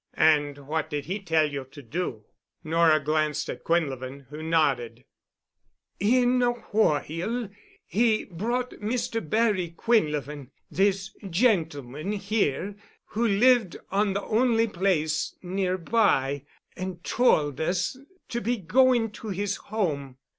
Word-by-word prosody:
"And 145 -2 +3
what 155 +1 -1
did 145 -2 -3
he 190 +5 -3
tell 160 -5 +2
you 140 -2 -4
to 140 +2 -13
do?" 120 -6 -4 0.4
Nora 160 -1 +4
glanced 155 +1 0
at - - -9
Quinlevin, 140 -5 -1
who 150 +1 -7
nodded. 150 -7 0 0.9
"In 250 +4 +3
a 240 0 +3
whoile 215 0 0 0.4
he 220 0 +2
brought 240 +8 -2
Mr. 230 +1 -1
Barry 200 -6 +1
Quinlevin—this 185 - 0
gentleman 165 - 0
here—who 205 - -2
lived 220 -2 +4
on 200 0 +2
the 200 - -2
only 230 0 +2
place 175 -6 0
nearby, 180 - +1 0.3
and 185 -1 -6
tould 155 - +2
us 175 +7 0 0.3
to 240 - -2
be 240 +1 0
going 235 +4 +3
to 215 +1 -8
his 200 +1 -2
home. 145 -11 -3
185 Hz, 115 wpm, -26 LUFS, 150-220 Hz, 0.9 s, Nora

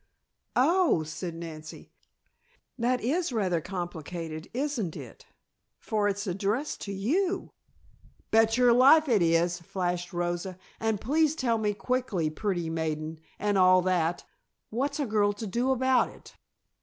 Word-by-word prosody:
"Oh," 320 - +3
said 165 +2 -6
Nancy. 160 -2 -9 0.8
"That 245 +1 0
is 320 +7 0
rather 185 -8 0
complicated, 170 -2 -6
isn't 250 - -2
it, - - -11 0.5
for 210 -3 -1
it's 205 +1 -2
addressed 200 +9 -2
to 200 - -5
you?" 345 - -1 0.8
"Bet 225 +1 +4
your 245 -1 +5
life 280 +6 +6
it 225 -7 +3
is," 170 +1 +2
flashed 175 0 -3
Rosa. 175 +1 -3 0.2
"And 220 -2 0
please 305 +6 +2
tell 235 -7 0
me 210 -1 0
quickly, 230 -10 -1
pretty 175 -1 -2
maiden, 160 -1 -3 0.2
and 205 -1 +1
all 185 0 +6
that, 175 -2 0 0.5
what's 280 +6 -1
a 290 - +1
girl 210 -3 +2
to 205 +2 -6
do 240 +6 -1
about 260 0 +3
it?" - - -16
205 Hz, 135 wpm, -28 LUFS, 175-250 Hz, 0.8 s, life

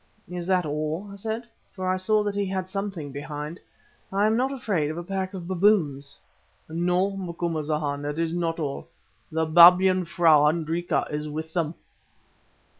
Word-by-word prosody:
"Is 180 0 -6
that 185 -2 +2
all?" 155 +5 -3
I - - -8
said, 220 +4 -4 0.3
for 185 -2 -4
I 185 - +2
saw 210 +3 +2
that 205 -1 -2
he 200 -1 -1
had 190 -1 -3
something 195 -6 -4
behind. 150 +3 -6 0.5
"I 200 +2 +2
am 220 +1 +3
not 260 +3 +1
afraid 205 - -1
of 155 - -5
a 175 - -4
pack 190 +1 -3
of 175 -2 -7
baboons." 170 -8 +1 0.5
"No, 180 +4 +1
Macumazahn, 155 -5 -2
it 145 +1 -3
is 165 0 -1
not 170 -1 -1
all. 145 -4 -4 0.4
The 160 0 0
Babyan 180 +3 +7
frau, 160 -3 +5
Hendrika, 165 +2 0
is 150 0 -3
with 160 +2 -6
them." 165 -2 -1
175 Hz, 165 wpm, -25 LUFS, 155-190 Hz, 0.5 s, Babyan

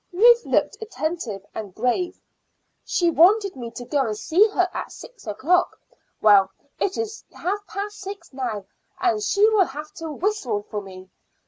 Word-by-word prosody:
Ruth 470 +6 +5
looked - - +1
attentive 315 - -4
and 205 -4 -7
grave. 345 - -1 0.6
"She 345 -2 +1
wanted 390 +4 +4
me 240 -3 -6
to 245 - -6
go 290 +3 0
and 215 -1 -3
see 350 - +4
her 370 -4 +1
at - - -5
six 475 - -13
o'clock. 340 - +1 0.4
Well, 200 -3 +6 0.3
it 390 - 0
is 445 -1 -4
half 400 +4 -3
past 410 +3 -5
six 395 -5 -8
now, 235 -7 -3 0.3
and 370 +3 +1
she 415 +1 +4
will 420 -4 +4
have 300 +1 -8
to 325 -1 -5
whistle 295 - -1
for 210 - -2
me. 190 -1 -12
345 Hz, 160 wpm, -23 LUFS, -, 0.6 s, Well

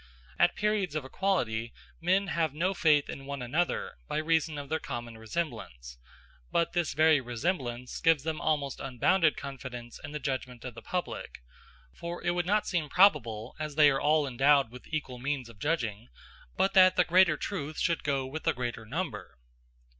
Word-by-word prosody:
At 175 0 +4
periods 210 -6 0
of 150 -3 -2
equality 120 - -1 0.3
men 185 +4 +2
have 165 -6 -1
no 180 +5 +1
faith 150 -5 +3
in 135 0 -7
one 140 -2 -4
another, 155 - -1
by - - -2
reason 160 -1 +1
of 145 -1 -6
their 160 +3 -1
common 120 -1 -6
resemblance; 110 - -5 0.5
but 170 - +1
this 175 -5 0
very 155 -1 +5
resemblance 125 -1 -3
gives 165 -4 +4
them 160 +1 -3
almost 145 -4 0
unbounded 150 +6 +2
confidence 125 -3 -7
in 145 - -7
the 150 - -3
judgment 130 -4 -4
of 125 - -5
the - - -10
public; 180 - -5 0.5
for 170 +1 -6
it 175 - +2
would 175 0 -1
not 210 +2 +2
seem 165 -5 -1
probable, 120 - +3
as 150 -2 -4
they 150 -1 +7
are 135 - -1
all 150 0 +3
endowed 135 -1 +3
with 125 0 -12
equal 150 -6 -4
means 135 -2 -2
of 110 -3 -15
judging, 120 -6 -2 0.5
but 195 - +2
that 185 -1 +7
the 180 - +5
greater 180 -3 +5
truth 155 -5 -4
should 170 -2 0
go 140 -2 0
with 150 +4 -5
the - - +1
greater 120 -2 -4
number. 130 - -4
145 Hz, 175 wpm, -29 LUFS, 125-170 Hz, 0.5 s, they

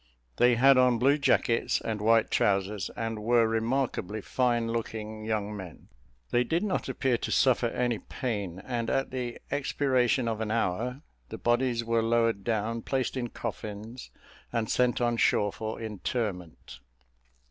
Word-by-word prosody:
They 120 0 +5
had 135 +2 +6
on 125 -2 +4
blue 140 +5 +3
jackets 120 -4 +2
and 110 -2 -4
white 115 +1 +3
trousers, 100 -1 +1
and 115 -1 -3
were 115 +1 +3
remarkably 115 -2 -1
fine 120 +1 0
looking 110 -1 -4
young 105 -1 -2
men. 95 -5 -10 0.4
They 120 - +3
did 165 - 0
not 205 -3 -1
appear 125 -4 0
to - - -4
suffer 125 -2 +3
any 120 -1 -1
pain, 100 -8 -4
and 120 -2 -2
at 135 0 0
the 125 -2 -4
expiration 130 -3 +1
of 115 -1 -2
an 110 - -2
hour, 115 - -1 0.3
the - - -6
bodies 120 0 +1
were 115 0 +2
lowered 115 -2 +1
down, 115 +1 -1
placed 130 +1 -1
in 125 -2 -2
coffins, 110 +1 -7 0.4
and 115 -2 -1
sent 125 -1 +2
on 120 -1 +1
shore 105 -2 +2
for 110 0 -5
interment. 105 - -4
115 Hz, 150 wpm, -28 LUFS, 110-125 Hz, 0.4 s, had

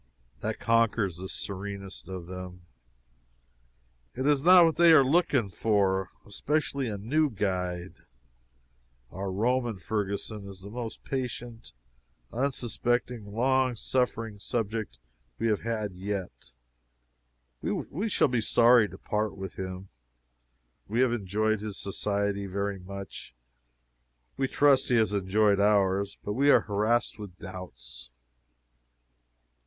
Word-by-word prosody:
That - - -3
conquers 115 -5 +2
the 95 +1 -7
serenest 100 -1 -6
of 90 -2 -6
them. 90 0 -8 1.5
It 130 +2 -2
is 145 -1 +3
not 180 0 +8
what 165 - +2
they 170 -1 +7
are 145 - +8
looking 135 - +2
for 95 -1 +1 0.2
especially 140 +4 -1
a 105 -2 -3
new 145 +10 +1
guide. 90 -4 -3 1.1
Our 95 0 -4
Roman 120 +2 0
Ferguson 100 +1 -3
is 95 -1 -10
the 100 +2 -9
most 115 -1 -6
patient, 120 - -5 0.6
unsuspecting, 120 -3 -1
long 130 +2 +2
suffering 115 -3 -1
subject 110 - -3 0.4
we - - -2
have 105 - +1
had 110 -4 -2
yet. 95 -3 -5 1.1
We 200 +9 -2
shall 185 - +3
be 125 -3 0
sorry 115 -1 +5
to - - -11
part 105 -2 -2
with 95 -1 -6
him. 95 0 -6 1.0
We 115 +4 +1
have 130 -2 +3
enjoyed 110 0 0
his 105 -1 -5
society 100 0 -1
very 100 +1 -2
much. 95 -9 -9 1.0
We 135 - 0
trust 140 0 +4
he 125 - +3
has 110 -3 +3
enjoyed 100 +1 +2
ours, 100 -1 +2
but 105 - -2
we 140 +5 +3
are - - +7
harassed 110 +3 0
with 100 -4 -9
doubts. 60 -10 -9
105 Hz, 120 wpm, -28 LUFS, 95-120 Hz, 1.5 s, not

